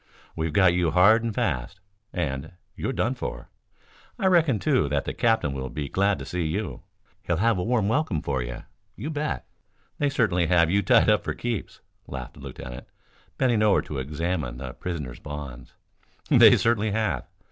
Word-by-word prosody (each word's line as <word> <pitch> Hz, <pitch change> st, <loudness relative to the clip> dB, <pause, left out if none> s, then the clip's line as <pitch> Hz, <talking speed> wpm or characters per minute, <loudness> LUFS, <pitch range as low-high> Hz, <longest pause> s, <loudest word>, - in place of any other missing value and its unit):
We've 80 Hz, -1 st, -2 dB
got 95 Hz, +1 st, +4 dB
you 90 Hz, -1 st, +2 dB
hard 100 Hz, +7 st, +5 dB
and 115 Hz, -, -1 dB
fast, 80 Hz, -, -2 dB, 0.3 s
and 75 Hz, -1 st, -3 dB, 0.2 s
you're -, -, -2 dB
done 120 Hz, -1 st, 0 dB
for. -, -, -6 dB, 0.7 s
I -, -, -2 dB
reckon, 165 Hz, -, +4 dB
too, 130 Hz, -, +1 dB
that 70 Hz, -1 st, 0 dB
the -, -, -3 dB
captain 110 Hz, -12 st, +1 dB
will 65 Hz, -1 st, -4 dB
be 70 Hz, 0 st, -5 dB
glad 100 Hz, +3 st, +2 dB
to -, -, -7 dB
see 90 Hz, -, -3 dB
you. 100 Hz, +6 st, -3 dB, 0.4 s
He'll 85 Hz, -, -1 dB
have 110 Hz, +1 st, +2 dB
a -, -, -1 dB
warm 110 Hz, -2 st, +1 dB
welcome 115 Hz, -, 0 dB
for 65 Hz, -2 st, -1 dB
you, -, -, -6 dB, 0.3 s
you 145 Hz, +9 st, -5 dB
bet. 150 Hz, 0 st, -3 dB, 0.5 s
They 145 Hz, -, +2 dB
certainly 105 Hz, -, +1 dB
have 85 Hz, -1 st, +4 dB
you 100 Hz, +2 st, +3 dB
tied 95 Hz, -, +4 dB
up -, -, +2 dB
for -, -, -3 dB
keeps," 120 Hz, -4 st, -4 dB, 0.3 s
laughed 65 Hz, -2 st, -7 dB
the -, -, -16 dB
lieutenant, 60 Hz, 0 st, -8 dB, 0.5 s
bending 120 Hz, -5 st, +2 dB
over 105 Hz, -3 st, +4 dB
to 70 Hz, -, -5 dB
examine 75 Hz, -2 st, -3 dB
the 65 Hz, -1 st, -6 dB
prisoner's 75 Hz, -9 st, -5 dB
bonds. 70 Hz, -5 st, -8 dB, 0.5 s
"They -, -, +8 dB
certainly 110 Hz, -2 st, +1 dB
have. 105 Hz, -, -1 dB
90 Hz, 180 wpm, -25 LUFS, 70-110 Hz, 0.7 s, They